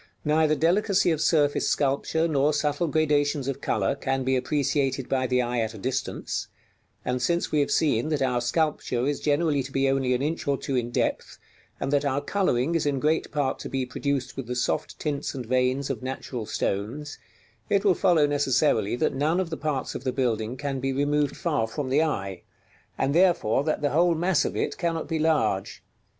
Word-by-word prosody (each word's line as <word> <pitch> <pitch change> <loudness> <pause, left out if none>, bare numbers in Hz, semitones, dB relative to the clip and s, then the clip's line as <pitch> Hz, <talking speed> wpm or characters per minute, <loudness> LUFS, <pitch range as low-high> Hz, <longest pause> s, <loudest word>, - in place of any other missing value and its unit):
Neither 155 0 +3
delicacy 185 +4 +2
of 160 -1 -1
surface 150 -3 +2
sculpture, 145 +4 +1
nor 150 -1 +2
subtle 150 +3 0
gradations 145 -2 +1
of 140 0 -3
color, 100 -7 0
can 135 -1 -2
be 130 +1 +1
appreciated 135 0 0
by 130 -1 0
the 125 0 +2
eye 120 0 -1
at 110 0 -2
a - - -8
distance; 130 +6 -3 0.6
and 125 0 -1
since 170 +7 0
we 150 - +2
have 145 - +1
seen 145 -3 +1
that 150 -3 0
our 125 -2 +1
sculpture 125 -2 0
is 145 0 -1
generally 150 -1 +1
to 135 +1 -7
be 135 0 +1
only 135 -2 +1
an 125 - -2
inch 155 +1 -2
or 140 -1 +2
two 135 - -3
in 120 -1 0
depth, 120 - -2 0.4
and 135 - -2
that 145 - +3
our 140 -1 0
coloring 145 -3 0
is 165 -3 +1
in 140 -2 0
great 155 +3 0
part 145 -3 -1
to - - -6
be 135 -1 -1
produced 130 0 -2
with 135 -4 -6
the 125 - -3
soft 125 - -1
tints 145 -2 -3
and 130 -2 -5
veins 130 +3 +1
of 120 - -5
natural 130 -3 -5
stones, 110 +8 -3 0.5
it 200 0 +2
will 195 - +6
follow 175 -5 +3
necessarily 145 -6 +2
that - - 0
none 150 +6 +1
of 180 -3 -2
the - - -1
parts 145 -4 -2
of - - -6
the 130 - 0
building 120 -2 -1
can 140 0 -3
be 135 +1 -1
removed 145 +1 0
far 145 -11 0
from 130 +3 -4
the 145 +3 +4
eye, 100 - -2 0.6
and 140 - 0
therefore 170 - +3
that 155 0 -1
the 145 - +2
whole 170 +2 +3
mass 170 -1 +2
of - - -3
it - - -2
cannot 165 -2 -1
be 160 - -1
large. 145 - 0
140 Hz, 200 wpm, -26 LUFS, 130-155 Hz, 0.6 s, will